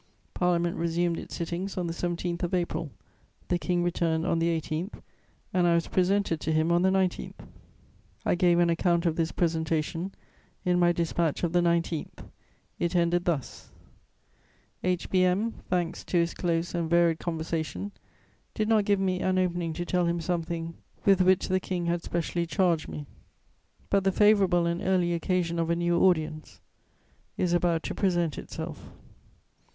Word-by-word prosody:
Parliament 175 -1 +1
resumed 170 0 0
its - - -8
sittings 175 +4 -4
on 180 - -1
the 165 - -3
17th 175 0 -3
of 175 0 0
April; 170 -3 -2 0.6
the 175 - +1
King 175 -1 0
returned 165 -2 0
on 165 - +1
the 165 - +1
18th, 160 +5 -5 0.5
and 180 -1 +3
I 170 - +4
was 170 - 0
presented 185 -3 +1
to 160 - -1
him 155 +1 +2
on 175 0 +3
the 190 - +4
19th. 190 -1 0 0.9
I - - +3
gave 175 -1 +3
an 175 -1 +4
account 170 0 +1
of 165 -2 +2
this 165 -1 0
presentation 165 +1 -1 0.5
in 180 0 +2
my 175 0 +5
dispatch 170 -2 -1
of 170 -1 0
the 175 - +4
19th; 170 -2 -1 0.5
it 170 +1 -1
ended 175 0 +2
thus: 160 -7 -3 1.1
"H. 180 -1 0
B. 185 -1 +4
M., 195 +5 +2 0.2
thanks 175 -2 -1
to 180 - 0
his 170 0 +2
close 170 -1 -1
and 170 -2 -1
varied 170 -1 +3
conversation, 165 +3 -3 0.6
did 215 - 0
not 220 -2 +3
give 200 -1 +2
me 185 -1 0
an 185 0 +1
opening 175 -2 0
to 175 +2 -4
tell 180 -1 +1
him 170 0 0
something 165 -1 -3 0.3
with 195 -2 +5
which 185 0 +3
the 185 0 +1
King 180 -2 -3
had 170 0 0
specially 170 0 -2
charged 170 -4 +1
me; 150 - -6 0.9
but 200 -1 +3
the 195 - +3
favourable 195 -4 +4
and 170 +1 -1
early 180 -2 +1
occasion 170 -1 0
of 165 0 0
a 170 - +2
new 175 0 +1
audience 155 -4 +1 0.8
is 175 -1 +1
about 175 -2 +1
to - - -3
present 175 -6 0
itself." - - -7
175 Hz, 165 wpm, -28 LUFS, 170-180 Hz, 1.1 s, my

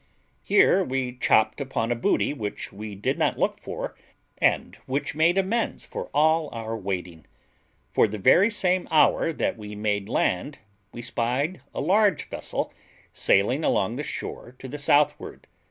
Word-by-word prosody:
Here 195 -1 +4
we 130 -4 -2
chopped 110 +1 +2
upon 120 -4 -2
a - - +2
booty 120 +4 +1
which 105 -7 -5
we 105 +1 -7
did 100 - -2
not - - +1
look - - 0
for, - - -6 0.4
and - - +1
which 140 +1 -2
made 160 +4 +3
amends 210 +5 -1
for - - -6
all 155 +1 +3
our 115 -1 -4
waiting; 90 -5 -5 0.6
for - - +4
the 105 +1 -5
very 180 - +5
same 185 -4 0
hour 160 +1 +4
that 150 - -2
we 105 0 -8
made 105 -1 -1
land 115 +11 0 0.3
we 120 - -8
spied 125 +8 -1
a - - -4
large 200 +5 +2
vessel - - -4 0.4
sailing 125 +10 +2
along 105 -2 +1
the 140 - -3
shore 130 -3 -6
to 130 - -9
the 145 +3 -7
southward. 145 +1 +1
130 Hz, 155 wpm, -25 LUFS, 110-160 Hz, 0.6 s, very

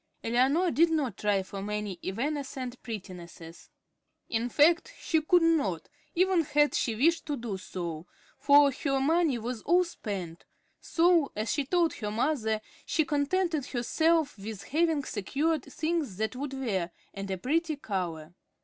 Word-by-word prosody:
Eleanor 270 +10 +2
did 335 +3 +4
not 300 -6 0
try 205 -2 +1
for 195 +1 -7
many 210 -2 -4
evanescent 260 +3 -3
prettinesses. 175 -6 -9 0.6
In 230 +1 -1
fact, 335 - +4
she 320 -2 +1
could 350 +2 +4
not, 280 - +1 0.3
even 370 0 +3
had 295 0 +2
she 230 - 0
wished 330 +9 +2
to 290 -2 -2
do 230 -4 -4
so, 175 -3 -6 0.3
for 285 0 +6
her 275 0 -1
money 315 -1 +2
was 235 0 -4
all 360 +1 +4
spent; 195 - -6 0.4
so, 335 -3 +3
as 215 +2 -2
she 285 - -1
told 340 +2 +2
her 210 -3 -4
mother, 220 -2 0 0.2
she 315 - +1
contented 300 0 0
herself 315 +2 +1
with 200 0 -7
having 315 +3 +1
secured 285 - -1
things 305 - -2
that 220 +3 -2
would 275 +1 -4
wear, 205 -10 -2 0.2
and 195 -1 -6
a 190 - -2
pretty 315 - 0
color. 175 - -4
270 Hz, 150 wpm, -29 LUFS, 210-315 Hz, 0.6 s, for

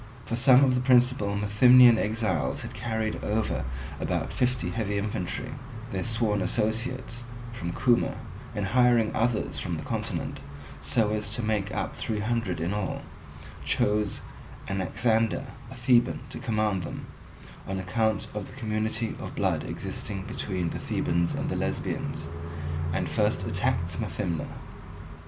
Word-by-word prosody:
For 115 - -2
some 130 +2 +7
of 130 -2 +4
the 125 - +1
principal 125 -5 +4
Methymnian 120 +4 +7
exiles 105 -7 0
had - - -7
carried 110 -2 -2
over 105 - 0 0.3
about - - -1
fifty 125 0 0
heavy 105 -3 -1
infantry, 105 +4 -2 0.4
their 95 - -1
sworn 115 -2 +1
associates, 115 +4 -1 0.3
from 85 -7 -4
Cuma, 120 +5 +2 0.4
and 105 - -1
hiring 120 +1 +4
others 115 -1 +1
from - - -2
the - - -5
continent, - - -3 0.4
so 105 - +3
as 105 0 -1
to 120 - -2
make 105 -2 0
up 95 -3 -2
three 110 -2 -2
hundred 115 -4 -1
in 85 +4 -1
all, 105 -2 -2 0.6
chose 105 0 +1 0.5
Anaxander, 110 +6 +1 0.2
a 130 - -9
Theban, 120 0 +3
to - - -4
command 110 -6 0
them, 85 - -6 0.6
on 95 - -2
account 110 +3 0
of 105 -2 -4
the - - -12
community 110 0 -1
of - - -6
blood - - +1
existing 95 -2 -4
between 95 -6 -2
the - - -4
Thebans 85 0 0
and - - -2
the - - -1
Lesbians, 80 - -2 0.6
and - - 0
first - - +1
attacked 85 -1 0
Methymna. 85 -3 -2
110 Hz, 140 wpm, -28 LUFS, 100-120 Hz, 0.6 s, some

